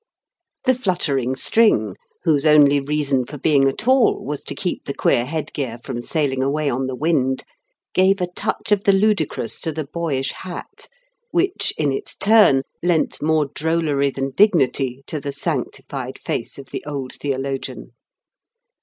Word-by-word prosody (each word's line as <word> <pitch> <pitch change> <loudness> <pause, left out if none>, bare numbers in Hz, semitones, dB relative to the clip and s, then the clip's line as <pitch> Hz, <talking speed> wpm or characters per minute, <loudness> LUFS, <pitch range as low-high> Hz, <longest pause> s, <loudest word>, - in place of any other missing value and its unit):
The 255 - +4
fluttering 150 - -1
string, 115 - +3 0.3
whose 155 -5 +2
only 145 -2 +6
reason 140 -2 0
for 145 +4 -9
being 140 -1 +3
at 135 - -3
all 260 -2 +3
was 145 +1 -4
to - - -4
keep 180 -3 -3
the 140 - -4
queer 120 - +2
head 155 +1 -4
gear 125 -5 -3
from 120 - -4
sailing 135 -1 -1
away 145 +2 0
on 130 +2 -1
the 130 - -3
wind, 135 -3 0 0.5
gave 190 +2 +4
a 180 - +1
touch 200 +4 -4
of 205 -1 +2
the 200 - +5
ludicrous 195 - +1
to 160 - -2
the 155 -1 -4
boyish 140 -3 -2
hat 180 -2 -9 0.4
which, 370 -2 +1
in 145 -3 +1
its 135 - -4
turn, 205 -11 +5 0.2
lent 175 -2 +1
more 155 -1 +2
drollery 155 -3 +1
than 135 0 -3
dignity 135 - +2
to 155 - -4
the 140 0 -4
sanctified 140 - -4
face - - -4
of 135 -1 -11
the - - -5
old 140 -3 -4
theologian. 135 -1 -4
145 Hz, 160 wpm, -21 LUFS, 135-175 Hz, 0.5 s, only